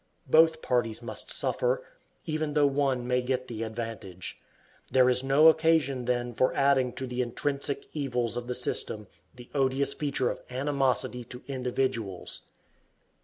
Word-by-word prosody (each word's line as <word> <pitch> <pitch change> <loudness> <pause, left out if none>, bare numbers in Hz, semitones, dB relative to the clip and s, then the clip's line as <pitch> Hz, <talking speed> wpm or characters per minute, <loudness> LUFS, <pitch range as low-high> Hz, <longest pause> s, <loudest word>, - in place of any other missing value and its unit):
Both 160 +3 +5
parties 120 -2 0
must - - -6
suffer, - - 0 0.4
even 155 -2 -2
though 150 -1 +4
one 135 -3 +1
may 125 0 +2
get 130 0 -2
the 115 -2 -6
advantage. 110 -5 -6 0.5
There 130 -1 +5
is 125 +1 0
no 140 +4 +6
occasion 160 -5 +3
then 120 0 -1
for 130 +3 +1
adding 135 -2 +3
to 130 - -4
the 125 0 -2
intrinsic 140 +3 -2
evils 125 -6 -1
of 120 0 -4
the 125 - -2
system 110 -3 0 0.3
the 120 -1 -13
odious 135 0 +1
feature 140 -4 0
of - - -7
animosity 130 -2 0
to 125 +2 -9
individuals. 125 -7 -2
130 Hz, 145 wpm, -28 LUFS, 120-140 Hz, 0.5 s, no